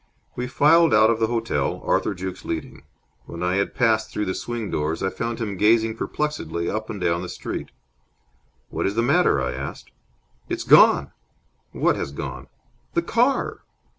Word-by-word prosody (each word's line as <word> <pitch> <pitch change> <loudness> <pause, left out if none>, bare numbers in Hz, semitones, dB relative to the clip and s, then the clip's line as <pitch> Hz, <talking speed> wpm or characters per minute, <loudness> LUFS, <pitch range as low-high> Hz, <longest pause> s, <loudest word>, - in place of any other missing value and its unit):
We 125 +1 -3
filed 165 +4 +4
out 110 +1 +6
of 115 - -1
the 110 - +2
hotel, 115 -1 -1
Arthur - - +1
Jukes 95 0 -6
leading. - - -5 0.4
When 85 +1 -7
I 90 +1 +1
had 100 - -1
passed 110 -4 +2
through 105 - -2
the 95 - -2
swing 120 -1 -4
doors, 75 +2 -2
I 95 - 0
found 115 0 -3
him 105 -5 -4
gazing 110 +2 +3
perplexedly 85 - -3
up 110 +1 -3
and 105 - -5
down 85 -1 0
the 90 - -6
street. - - -5 1.0
"What - - -1
is 100 - -2
the 115 - +2
matter?" 155 +9 +3
I 65 - -1
asked. 65 +2 -7 0.6
"It's - - -2
gone!" - - +6 0.6
"What - - +1
has - - -4
gone?" 70 - -6 0.5
"The - - +2
car!" - - +1
110 Hz, 170 wpm, -23 LUFS, 90-115 Hz, 1.0 s, out